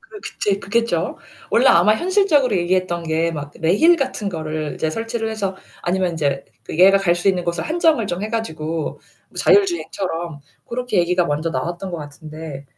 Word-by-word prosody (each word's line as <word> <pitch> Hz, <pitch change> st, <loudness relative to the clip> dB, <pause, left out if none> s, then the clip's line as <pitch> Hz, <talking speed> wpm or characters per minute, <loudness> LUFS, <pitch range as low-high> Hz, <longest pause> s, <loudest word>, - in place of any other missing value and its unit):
그게 475 Hz, -5 st, -13 dB, 0.2 s
제일 200 Hz, -1 st, +1 dB
크겠죠. 230 Hz, +4 st, -1 dB, 0.3 s
원래 245 Hz, +3 st, +4 dB
아마 215 Hz, -5 st, +6 dB
현실적으로 310 Hz, -, +2 dB
얘기했던 175 Hz, -1 st, 0 dB
게 165 Hz, +1 st, 0 dB
막 145 Hz, -2 st, -6 dB
레일 205 Hz, -, +5 dB
같은 260 Hz, -7 st, -2 dB
거를 155 Hz, -3 st, -4 dB
이제 160 Hz, -, -1 dB
설치를 225 Hz, +2 st, -3 dB
해서 195 Hz, -3 st, -3 dB, 0.3 s
아니면 185 Hz, +1 st, 0 dB
인제 140 Hz, -3 st, -1 dB, 0.2 s
그 160 Hz, -, -6 dB
얘가 195 Hz, +2 st, +7 dB
갈 175 Hz, -3 st, +2 dB
수 175 Hz, +3 st, 0 dB
있는 180 Hz, -2 st, +1 dB
곳을 170 Hz, -1 st, -2 dB
한정을 315 Hz, -, +2 dB
좀 175 Hz, +1 st, -3 dB
해 215 Hz, -, -2 dB
가지고 160 Hz, -8 st, -3 dB, 0.3 s
뭐 -, -, -21 dB
자율주행처럼 190 Hz, -, +1 dB, 0.2 s
고렇게 245 Hz, -4 st, -2 dB
얘기가 175 Hz, 0 st, +2 dB
먼저 150 Hz, +2 st, -1 dB
나왔던 175 Hz, +3 st, -3 dB
것 170 Hz, -, -4 dB
같은데 150 Hz, -1 st, -9 dB
185 Hz, 370 characters per minute, -20 LUFS, 160-225 Hz, 0.3 s, 얘가